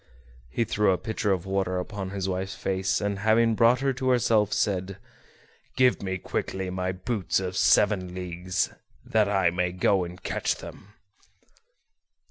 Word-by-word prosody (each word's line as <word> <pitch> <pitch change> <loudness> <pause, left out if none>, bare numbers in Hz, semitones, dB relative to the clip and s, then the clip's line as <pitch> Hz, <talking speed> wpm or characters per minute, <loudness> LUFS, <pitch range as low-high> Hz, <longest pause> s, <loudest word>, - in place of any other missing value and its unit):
He 115 - 0
threw 105 -2 +2
a 90 - +1
pitcher 110 -1 -2
of 90 -2 -1
water 95 -1 -1
upon 95 +1 -4
his 95 -1 -3
wife's 95 +1 -3
face, 95 0 -1
and, 100 -1 -2
having 110 +2 +3
brought 120 +3 +4
her 135 -1 +1
to 130 0 -1
herself, 110 -4 +3
said: 95 -2 -1 0.8
"Give 125 -1 +3
me 95 -1 -2
quickly 95 0 -3
my 90 0 -2
boots 95 0 -1
of 95 -1 -4
seven 95 -4 +3
leagues, 90 +1 -2 0.3
that 105 -2 +2
I 95 -4 +2
may 90 0 -1
go 95 +1 +2
and 90 +1 -8
catch - - -1
them." 105 +2 -12
95 Hz, 155 wpm, -26 LUFS, 90-105 Hz, 0.8 s, brought